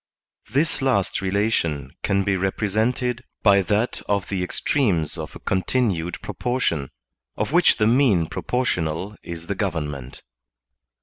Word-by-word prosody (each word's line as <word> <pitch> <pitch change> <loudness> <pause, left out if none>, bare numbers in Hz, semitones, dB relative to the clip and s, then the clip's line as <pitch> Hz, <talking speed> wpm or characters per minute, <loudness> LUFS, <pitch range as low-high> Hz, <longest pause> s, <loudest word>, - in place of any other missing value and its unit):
This 145 +6 +1
last 100 -9 +1
relation 95 -7 0
can 100 0 +1
be 100 0 +1
represented 110 +6 0 0.2
by 100 -2 +6
that 105 +5 0
of 100 -2 0
the 95 -2 -1
ex 90 - 0
tremes 95 - +1
of - - -7
a - - -8
continued 95 -4 0
proportion, 105 - -1 0.5
of - - -1
which 175 +2 +5
the 110 - +2
mean 115 -7 +4
proportional 95 -3 -2
is 85 -1 -7
the 100 - -2
government. 75 - -4
100 Hz, 130 wpm, -23 LUFS, 85-120 Hz, 0.5 s, by